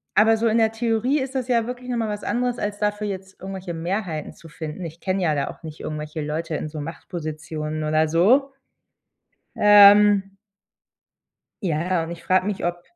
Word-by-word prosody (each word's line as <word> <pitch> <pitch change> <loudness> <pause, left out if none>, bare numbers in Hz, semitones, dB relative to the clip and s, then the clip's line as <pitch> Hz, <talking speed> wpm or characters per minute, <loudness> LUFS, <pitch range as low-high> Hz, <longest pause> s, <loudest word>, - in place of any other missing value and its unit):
aber 225 +1 +5
so 230 +1 +1
in 225 0 +2
der 220 -1 +3
Theorie 230 +5 +1
ist 265 +1 -5
das 255 -2 -2
ja 235 -2 +2
wirklich 250 0 -7
nochmal 230 -3 -1
was 210 0 -5
anderes, 245 0 -1
als 205 0 -3
dafür 210 0 -1
jetzt 190 -1 -7
irgendwelche 190 -2 -6
Mehrheiten 170 -2 -3
zu 165 - -15
finden. 155 +3 -7
Ich 165 0 -9
kenne 190 0 -1
ja 155 -3 +2
da 140 -1 -1
auch - - -12
nicht 155 -1 -9
irgendwelche 155 0 -5
Leute 155 +2 -3
in 155 - -3
so 150 -1 -6
Machtpositionen 155 -1 -5
oder 155 +1 +2
so. 235 - +3 1.0
Ähm 205 -1 +7 1.3
Ja, 160 -5 0
ja, 180 -2 0
und 165 - -6
ich 170 - -9
frage 185 0 +2
mich, 205 -2 -3
ob 175 0 -2
190 Hz, 185 wpm, -23 LUFS, 160-215 Hz, 1.3 s, Ähm